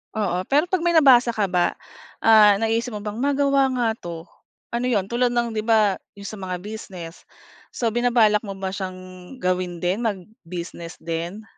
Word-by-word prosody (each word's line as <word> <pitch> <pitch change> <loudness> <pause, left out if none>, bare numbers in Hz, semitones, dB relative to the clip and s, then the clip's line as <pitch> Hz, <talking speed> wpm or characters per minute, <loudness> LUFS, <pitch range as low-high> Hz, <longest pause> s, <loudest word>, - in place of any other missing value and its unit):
Oo, 185 -4 -1
pero 290 +2 +3
'pag 370 - +2
may 345 -1 +2
nabasa 250 -6 +6
ka 200 -4 0
ba, 175 -1 +1 0.5
ah, 215 -2 +7
naiisip 225 +2 -1
mo 210 - -6
bang, 210 +1 -5
"magawa 275 0 +2
nga 245 -2 +1
'to" 170 -4 -7 0.5
ano 240 +1 -1
'yon 205 -6 +1
tulad 245 +1 +2
ng, 235 -1 0
'di 215 -1 -3
ba, 215 -4 +3 0.2
'yong 200 0 -9
sa 215 - -7
mga 185 -2 -4
business, 190 -6 -9 0.5
so 230 -2 -1
binabalak 235 -3 +3
mo 195 -1 -6
ba 190 0 -4
siyang 190 -1 -5 0.5
gawin 180 -1 -1
din 180 +4 0
mag-business 180 -5 -6
din? 170 +5 -4
210 Hz, 170 wpm, -23 LUFS, 185-235 Hz, 0.5 s, ah